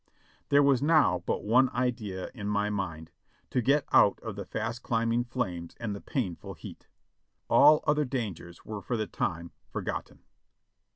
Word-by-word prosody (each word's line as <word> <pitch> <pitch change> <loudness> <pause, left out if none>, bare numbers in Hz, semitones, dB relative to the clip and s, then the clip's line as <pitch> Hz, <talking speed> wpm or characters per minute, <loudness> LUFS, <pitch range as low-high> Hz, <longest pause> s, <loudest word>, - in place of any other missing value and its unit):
There 145 0 +5
was 140 -2 +4
now 155 0 +4
but - - -1
one 125 +5 +4
idea 115 -7 -2
in 105 -4 -6
my 105 0 0
mind 85 -6 -4 0.2
— - - -38
to 125 - +1
get 140 +4 +2
out - - +5
of - - -6
the - - -6
fast 115 +1 -4
climbing 115 +1 0
flames 90 -9 -4
and 110 -4 -3
the 100 - -8
painful 110 - -4
heat. - - -11 0.6
All 150 +2 +7
other 150 0 +2
dangers 105 - -5
were 105 -2 -6
for 120 - -2
the 110 - -1
time 85 -4 -3 0.2
forgotten. - - -5
115 Hz, 165 wpm, -29 LUFS, 100-130 Hz, 0.6 s, All